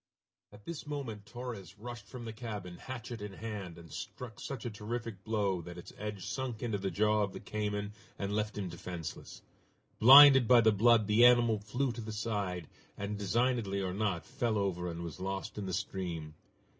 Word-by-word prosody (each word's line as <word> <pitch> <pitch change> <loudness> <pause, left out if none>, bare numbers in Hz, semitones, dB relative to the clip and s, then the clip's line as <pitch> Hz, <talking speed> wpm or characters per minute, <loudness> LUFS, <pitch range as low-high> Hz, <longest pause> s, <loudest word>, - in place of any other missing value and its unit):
At 105 0 -16
this 165 -3 -6
moment 115 -9 -5
Torres 115 -7 -7
rushed 120 0 -8
from 125 -2 -8
the 110 - -5
cabin, 105 -6 -6
hatchet 120 -3 -7
in 105 -1 -6
hand, 100 -5 -6
and 85 -1 -13
struck 115 -5 -7
such 130 -4 -6
a 120 - -2
terrific 105 -1 -5
blow 100 -4 0
that 85 +1 -9
its 90 - -10
edge 105 -2 -5
sunk 120 +2 -4
into 110 -4 -1
the 95 0 -1
jaw 105 +1 +2
of 100 -2 -1
the - - -6
cayman 105 -1 -3 0.2
and 100 +1 -2
left 105 -1 -1
him 100 -2 -2
defenseless. 85 -1 -7 0.6
Blinded 135 0 +10
by 120 0 +7
the 110 -1 +5
blood, 110 +1 +5
the 105 +3 +4
animal 120 -3 +6
flew 125 +6 -1
to 115 - -6
the 110 0 -6
side, 100 -6 -2 0.3
and, 100 +1 -3
designedly 110 0 +1
or 95 -2 -2
not, 100 -4 -1
fell 115 -3 -1
over 90 -3 -1
and 85 0 -5
was 85 -3 -7
lost 95 +2 -4
in 100 - -4
the - - -3
stream. 90 -6 -3
105 Hz, 190 wpm, -32 LUFS, 95-115 Hz, 0.6 s, Blinded